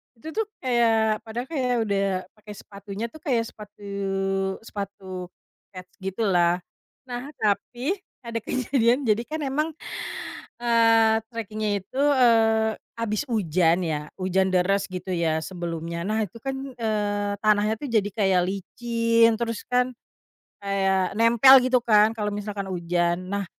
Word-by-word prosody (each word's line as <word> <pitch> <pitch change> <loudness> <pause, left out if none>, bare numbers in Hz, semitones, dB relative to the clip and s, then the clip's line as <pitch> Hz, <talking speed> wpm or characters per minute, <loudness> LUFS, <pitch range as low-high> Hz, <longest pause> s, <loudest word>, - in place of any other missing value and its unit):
itu 275 +8 -9
tuh 440 +4 -1 0.2
kayak 225 -3 +2
padahal 240 +3 -4
kayak 260 -6 0
udah 200 -2 0 0.3
pakai 215 -1 -12
sepatunya 200 +2 -7
tuh 315 - -12
kayak 255 -8 0
sepatu 210 -1 -13 0.8
sepatu 195 -4 -6 0.5
kets 185 0 -10
gitu 190 +3 -3
lah, 175 -3 +2 0.4
nah 250 0 -6
tapi 240 - -1 0.3
ada 230 0 -3
kejadian 250 +2 +1
jadi 215 0 +2
kan 315 - -2
emang, 300 +4 0 0.9
eee, 225 -1 +4
trekingnya 215 -2 -2
itu, 210 +7 -9
eee, 225 -4 +4 0.2
habis 230 0 -1
hujan 180 - +2
ya, 150 -3 -2
hujan 190 +1 +1
deras 190 +2 +2
gitu 185 0 -6
ya 160 -2 +1
sebelumnya 170 -1 -5
nah 215 +3 0
itu 205 0 -6
kan, 270 +4 -4 0.2
eee, 205 -2 -1
tanahnya 215 0 +3
tuh 290 - -4
jadi 215 -4 +2
kayak 190 -3 +2
licin 230 +4 +1
terus 230 -1 -3
kan, 250 0 0 0.7
kayak 195 -1 +1
nempel 235 +4 +7
gitu 255 0 +3
kan 215 -2 +5
kalo 210 -1 -2
misalkan 205 -1 -4
hujan, 175 0 -1
nah 200 +1 -2
215 Hz, 135 wpm, -25 LUFS, 190-235 Hz, 0.9 s, nempel